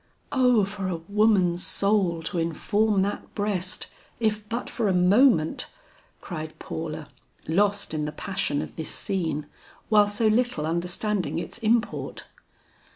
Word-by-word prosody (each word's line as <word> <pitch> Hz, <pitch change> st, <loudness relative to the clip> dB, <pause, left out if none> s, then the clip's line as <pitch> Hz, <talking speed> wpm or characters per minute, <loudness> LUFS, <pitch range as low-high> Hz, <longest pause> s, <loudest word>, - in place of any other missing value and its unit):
"O 250 Hz, -6 st, +4 dB
for 195 Hz, -1 st, -4 dB
a 185 Hz, -, -1 dB
woman's 185 Hz, 0 st, +2 dB
soul 195 Hz, -5 st, +2 dB
to 170 Hz, +2 st, -2 dB
inform 200 Hz, +5 st, +1 dB
that 205 Hz, +1 st, -4 dB
breast 200 Hz, -3 st, -1 dB, 0.3 s
if 215 Hz, -2 st, -1 dB
but 235 Hz, +2 st, -3 dB
for 230 Hz, -3 st, -1 dB
a 190 Hz, -, +2 dB
moment!" 180 Hz, -, +4 dB, 0.5 s
cried 155 Hz, -3 st, -6 dB
Paula, 160 Hz, -2 st, -5 dB, 0.4 s
lost 200 Hz, +2 st, +1 dB
in 150 Hz, -1 st, -1 dB
the 150 Hz, -, -3 dB
passion 150 Hz, -3 st, -2 dB
of -, -, -10 dB
this 160 Hz, -, -3 dB
scene, 165 Hz, -6 st, -2 dB, 0.4 s
while 210 Hz, -1 st, +6 dB
so 205 Hz, +2 st, -1 dB
little 220 Hz, -7 st, +2 dB
understanding 175 Hz, 0 st, -1 dB
its 170 Hz, -, -5 dB
import. 230 Hz, 0 st, 0 dB
195 Hz, 135 wpm, -26 LUFS, 165-215 Hz, 0.5 s, while